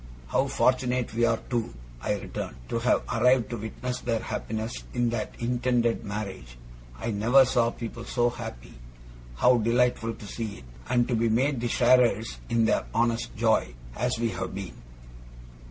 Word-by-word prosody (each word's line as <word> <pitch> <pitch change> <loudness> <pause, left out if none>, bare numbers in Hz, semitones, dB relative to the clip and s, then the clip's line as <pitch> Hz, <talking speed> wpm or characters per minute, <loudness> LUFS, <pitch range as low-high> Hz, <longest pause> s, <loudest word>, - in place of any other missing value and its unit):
'How - - +2
fortunate 125 -2 +1
we 120 +1 +2
are, 115 -1 +2
too,' 120 - -2 0.3
I - - 0
returned, - - -5
'to 115 - 0
have 120 +2 +2
arrived 125 +1 +3
to 120 - -2
witness 125 +3 -4
their 115 -2 -1
happiness 110 0 -4
in 120 -1 +1
that 110 -3 -3
intended 120 -1 +1
marriage! 100 - -6 0.4
I 115 - -2
never 120 +6 +5
saw 120 -2 +2
people 115 0 -7
so 120 -1 +1
happy. - - -8 0.6
How 125 - +4
delightful 115 0 +1
to - - -11
see 105 0 -5
it, - - -13 0.3
and 120 -1 +3
to 125 - -1
be 115 0 +2
made 130 +3 +1
the 120 - 0
sharers 120 - +3
in 115 -1 +3
their - - +2
honest 115 - 0
joy, - - +2 0.2
as 125 0 0
we 115 0 0
have 95 -2 -4
been! 95 -2 -6
115 Hz, 165 wpm, -27 LUFS, 110-125 Hz, 0.6 s, never